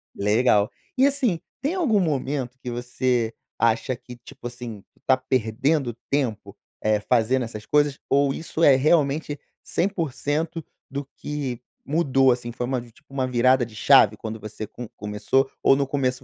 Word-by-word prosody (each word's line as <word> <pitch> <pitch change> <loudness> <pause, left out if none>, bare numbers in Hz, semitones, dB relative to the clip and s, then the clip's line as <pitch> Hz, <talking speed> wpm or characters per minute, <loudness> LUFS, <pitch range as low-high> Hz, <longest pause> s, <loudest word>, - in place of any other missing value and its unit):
Legal. 105 0 +3 0.3
E 265 - +5
assim, 260 - +1 0.2
tem 290 +7 -1
algum 275 - +2
momento 135 -6 -1
que 125 - -5
você 120 -1 -1 0.3
acha 115 +3 +2
que, 125 0 -12
tipo 130 +1 -10
assim, 120 -4 -8
tu - - -31
está 130 - +3
perdendo 130 +2 0 0.2
tempo, 110 -7 -1 0.3
eh, 110 -1 +2
fazendo 125 +3 +2
essas 110 -2 -7
coisas 145 0 +2
ou 140 0 +3
isso 165 +2 -3
é 140 - +8
realmente 150 0 +2 0.2
100% 165 -3 -2 0.3
do 140 +1 -4
que 140 -5 -4 0.3
mudou, 135 -4 +3
assim, 120 -1 -2
foi 120 - -3
uma 130 0 -1
vi 120 -1 -12
tipo, 135 - -21
uma 130 -2 0
virada 130 0 +3
de 110 -2 -14
chave 110 -3 +6
quando 110 +1 -6
você 110 0 -6
com 120 +3 -9
começou 110 +6 0
ou - - +6
no 140 0 +1
começo, 130 -2 -1
ou - - -16
130 Hz, 165 wpm, -24 LUFS, 120-145 Hz, 0.3 s, é